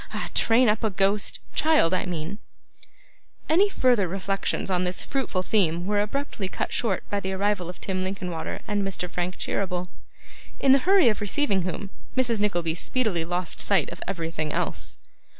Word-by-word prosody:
Ah! - - -3
Train 235 +2 +4
up 210 +1 +2
a 220 - +2
Ghost 195 +1 +1
child, 305 - +3
I 185 - 0
mean 175 +3 -4 0.5
' - - -34
Any 385 +6 +5
further 245 - +3
reflections 195 +1 -2
on 180 0 +2
this 180 0 -2
fruitful 260 -9 -1
theme 175 -4 +1
were 205 +1 +2
abruptly 215 -2 -3
cut - - -3
short 205 -6 -1
by 205 - +1
the 190 -1 -3
arrival 195 -2 0
of 180 - -9
Tim 185 -1 -2
Linkinwater 180 -3 -4
and 205 -1 0
Mr. 195 -2 -2
Frank 180 +1 -3
Cheeryble; 180 -2 -2 0.7
in 270 - +4
the 275 - +7
hurry 390 -8 +6
of 215 - -2
receiving 205 -1 +1
whom, 185 +2 -4 0.3
Mrs. 240 -4 +3
Nickleby 175 -6 +1
speedily 190 -1 -1
lost 175 0 -2
sight 190 -8 +2
of - - -9
everything 165 -4 -3
else. - - -2
195 Hz, 170 wpm, -26 LUFS, 180-215 Hz, 0.7 s, the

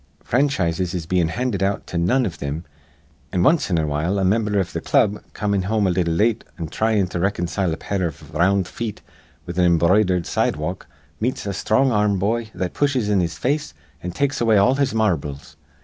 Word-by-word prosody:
Franchises 95 - 0
is 85 -3 -3
bein' 90 0 +1
handed 110 +2 -2
out 100 +1 0
to - - -8
none 95 +10 +2
iv 95 - -3
thim; 70 +4 -5 0.7
an' 90 - +1
wanst 155 - +3
in 90 - +1
a 80 - +1
while 75 +6 -1
a 95 - +1
mimber 105 +1 +1
iv 95 -3 -1
th' - - -4
club, 105 0 +2
comin' 100 -2 0
home 105 +2 0
a 95 - +2
little 85 -2 0
late 110 +5 +2
an' 85 - -4
thryin' 110 +4 +1
to 90 - -4
riconcile 90 -1 0
a 80 - -3
pair 95 -3 -1
iv 80 - -10
r 75 - -4
round 95 +1 +3
feet 110 +2 -5 0.4
with 90 +1 -4
an 90 - +4
embroidered 90 +1 +3
sidewalk, - - -2 0.3
meets 125 +1 -2
a - - -2
sthrong 130 +7 +2
ar 105 -2 +2
rm 100 -1 +1
boy 110 +4 -1
that 90 -1 -3
pushes 130 -7 +1
in 100 -2 +3
his 85 -2 -1
face 150 +4 -1 0.3
an' 90 - -4
takes 140 +10 -1
away 115 -2 +4
all 100 +6 +5
his 140 -1 +1
marbles. 80 -10 -1
95 Hz, 210 wpm, -22 LUFS, 85-110 Hz, 0.7 s, all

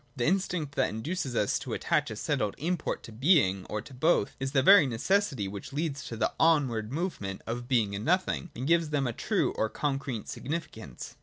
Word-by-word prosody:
The 120 -3 -1
instinct 180 -4 0
that - - +1
induces 130 +3 -3
us 105 -3 +1
to - - -5
attach - - 0
a - - -5
settled 105 -1 -1
import 170 +2 -2
to 115 - -10
Being, 110 - +3
or 105 0 -3
to 130 - -13
both, 130 -4 +2
is 135 0 -2
the 135 -2 +3
very 195 -3 +8
necessity 130 - 0
which 100 +6 -7
leads 145 -1 -2
to 115 - -6
the - - 0
onward 130 -9 +2
movement 140 - -3
of 120 +1 -4
Being 115 -6 +2
and 100 +1 -4
Nothing, 180 +1 0
and 125 - -4
gives 165 0 +3
them 145 -2 0
a 120 - -1
true - - 0
or 110 - 0
concrete 135 -5 -3
significance. 145 - -6
135 Hz, 200 wpm, -29 LUFS, 110-160 Hz, -, very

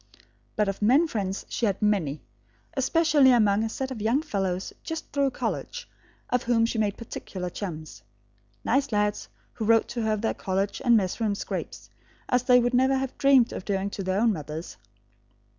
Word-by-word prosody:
But 210 -1 +1
of 195 +1 -3
men 265 +11 +4
friends 195 -7 -3
she 235 - -1
had 195 - -1
many, 180 -9 0 0.5
especially 295 0 +4
among 215 -3 +3
a 225 - -1
set 265 +3 -4
of 235 -5 -6
young 235 +8 +1
fellows 195 - -2
just 325 0 -6
through 280 -1 +1
college, - - -4 0.4
of 250 - +2
whom 230 -2 +2
she 230 0 -2
made 205 -2 0
particular 185 -5 -6
chums; 160 -6 -7 0.6
nice 270 +3 +1
lads, 210 -1 0 0.2
who 225 - -5
wrote 225 0 +4
to 240 - -3
her 220 -1 +1
of 210 - -2
their 225 - 0
college 195 +1 -2
and 235 -2 +5
mess 190 0 -1
room 210 -2 +1
scrapes, - - -6 0.4
as 250 - +2
they 250 0 +5
would 245 +1 0
never 260 +2 +3
have 265 -1 -3
dreamed 270 -4 +5
of - - -6
doing 195 0 -2
to 200 - -5
their 190 +1 0
own 225 0 +3
mothers. 155 0 -6
220 Hz, 185 wpm, -26 LUFS, 195-250 Hz, 0.6 s, and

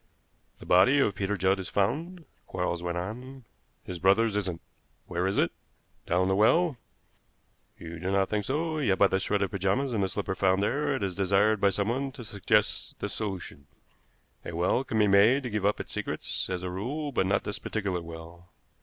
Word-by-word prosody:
"The - - -13
body 95 +10 +5
of 120 -8 +3
Peter 100 +1 -2
Judd 95 +2 +2
is 95 - -5
found," 160 - -1 0.2
Quarles 90 -2 -2
went 85 0 -3
on, 125 +8 -6 0.4
"his 90 -1 -7
brother's 100 +4 +3
isn't. 95 -5 -2 0.5
Where 90 +1 -1
is 95 - -1
it? 85 - +2 0.6
Down 90 +2 +2
the 95 - +2
well? 150 - +3 1.0
You 85 0 -8
do 90 +3 -3
not 95 0 +2
think 105 -1 -2
so, 155 +4 -1
yet 105 -10 +2
by 100 - +6
the 95 -1 +1
shred 100 +1 0
of 100 - -2
pajamas 100 +7 0
and 105 -3 +1
the 95 - 0
slipper 100 0 -3
found 95 +1 +2
there 145 +5 0
it 130 - -3
is 95 -2 -1
desired 100 +3 +2
by 100 - +5
someone 120 +8 -1
to 130 -4 -9
suggest 100 -3 0
this - - -4
solution. 90 -9 -5 0.8
A - - -7
well 90 +9 +1
can 110 - -3
be 105 - +5
made 105 +7 +5
to 125 - -4
give 105 -1 +1
up 105 - 0
its - - -6
secrets, - - -2
as 90 -1 -3
a 90 - -3
rule, 140 +11 -3
but 95 - +1
not 100 +1 +1
this 105 0 -4
particular 95 -5 -2
well. 85 +1 -11
100 Hz, 200 wpm, -28 LUFS, 95-115 Hz, 1.0 s, by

